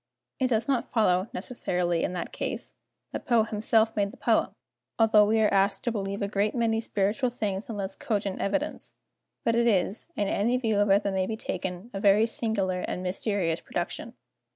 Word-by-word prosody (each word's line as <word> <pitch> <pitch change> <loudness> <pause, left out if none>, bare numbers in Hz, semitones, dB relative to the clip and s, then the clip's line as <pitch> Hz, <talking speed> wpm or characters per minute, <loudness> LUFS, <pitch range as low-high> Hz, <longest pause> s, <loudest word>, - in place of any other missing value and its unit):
It 260 - +2
does 230 -1 +1
not 265 -4 0
follow, 195 -3 +2
necessarily, 180 -5 -1
in - - -1
that 175 - -5
case, - - -4 0.4
that - - -5
Poe 235 -4 +4
himself 220 +1 +1
made 200 -1 +1
the - - -13
poem, - - +2 0.5
although 220 -2 +5
we 220 +1 +3
are 210 - +3
asked 195 0 +2
to 240 - 0
believe 200 -1 -3
a - - 0
great 205 +2 0
many 225 -2 +1
spiritual 215 +4 0
things 210 -4 -3
on 220 - -4
less 195 -1 -3
cogent 200 -4 -2
evidence, 290 +10 -2 0.5
but 230 - +2
it 235 +1 +3
is, 200 - +1
in 205 - 0
any 230 +6 +1
view 225 -5 0
of 205 0 +3
it 200 +2 +4
that 200 - -1
may 190 -1 0
be 220 - -3
taken, 185 +2 -5
a 195 - -3
very 205 +2 +5
singular 210 -5 0
and 180 0 -4
mysterious 185 -3 -1
production. - - -5
205 Hz, 195 wpm, -27 LUFS, 195-225 Hz, 0.5 s, although